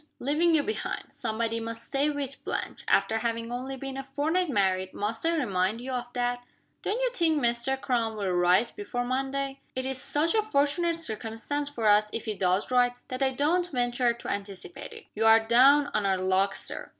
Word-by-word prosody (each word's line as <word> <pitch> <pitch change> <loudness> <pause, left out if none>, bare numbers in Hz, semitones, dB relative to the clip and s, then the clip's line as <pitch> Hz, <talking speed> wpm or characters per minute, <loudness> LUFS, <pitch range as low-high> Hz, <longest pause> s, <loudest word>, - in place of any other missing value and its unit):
"Leaving 320 +5 +2
you 295 - +3
behind. 435 - -4
Somebody 230 0 -2
must 230 0 -5
stay 280 +2 +1
with 280 -2 -4
Blanche. - - -4
After 225 0 +2
having 230 0 -2
only 260 +2 -4
been 270 0 -6
a 270 - -4
fortnight 310 +6 0
married, 190 -5 0
must 220 +2 -3
I 335 - +2
remind 200 - 0
you 255 +2 -6
of 245 -1 -4
that?" 245 0 -1 0.4
"Don't 435 +4 -1
you - - +1
think 325 -8 +2
Mr. 240 +1 0
Crum 230 -4 -1
will 195 -3 -1
write 180 +6 +3
before 245 -13 -3
Monday?" 270 +2 -2
"It 260 - -1
will 265 - -1
be - - -1
such 295 +5 0
a 440 - +4
fortunate 335 -3 +1
circumstance 260 +1 -3
for 235 -6 -4
us, 210 0 +5
if 230 - -4
he 215 - -1
does 190 +3 0
write, 245 -1 +3
that 255 +1 -5
I 270 - +4
don't 340 +7 +1
venture 245 -1 +1
to 235 - -8
anticipate 200 - -6
it." 450 -1 -12
"You 220 +1 0
are 225 0 +8
down 265 +6 +5
on 210 -2 +1
our 190 -1 +2
luck, 190 +1 +1
Sir." - - -6
245 Hz, 200 wpm, -28 LUFS, 225-285 Hz, 0.4 s, are